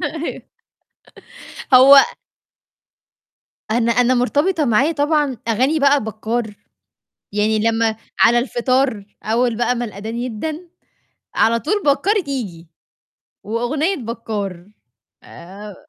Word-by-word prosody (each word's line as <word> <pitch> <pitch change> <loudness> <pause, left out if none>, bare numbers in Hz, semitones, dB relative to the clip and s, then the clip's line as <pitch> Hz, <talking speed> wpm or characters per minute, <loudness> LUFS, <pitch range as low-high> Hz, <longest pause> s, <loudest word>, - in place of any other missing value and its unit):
أيوه 320 +1 -5 1.3
هو 270 +2 +9 1.8
أنا 235 0 +1
أنا 245 +1 +3
مرتبطة 290 +6 +1
معايا 255 +7 +2
طبعًا 295 -4 0
أغاني 260 +8 +1
بقى 280 -3 +3
بكّار، 220 0 -4 0.8
يعني 210 +1 +1
لمّا 225 0 +1 0.2
على 240 +1 +5
الفطار 255 -2 0 0.2
أول 230 +1 0
بقى 240 +1 0
ما 240 0 -3
الأدان 215 +1 -7
يدَّن، 305 +9 -5 0.7
على 230 +1 +3
طول 410 - -2
بكّار 305 +9 +2
ييجي، 200 -12 -5 0.8
وأغنية 275 - -1
بكّار 210 - -6 0.5
آآ 195 +4 -11
240 Hz, 100 wpm, -19 LUFS, 220-280 Hz, 1.8 s, هو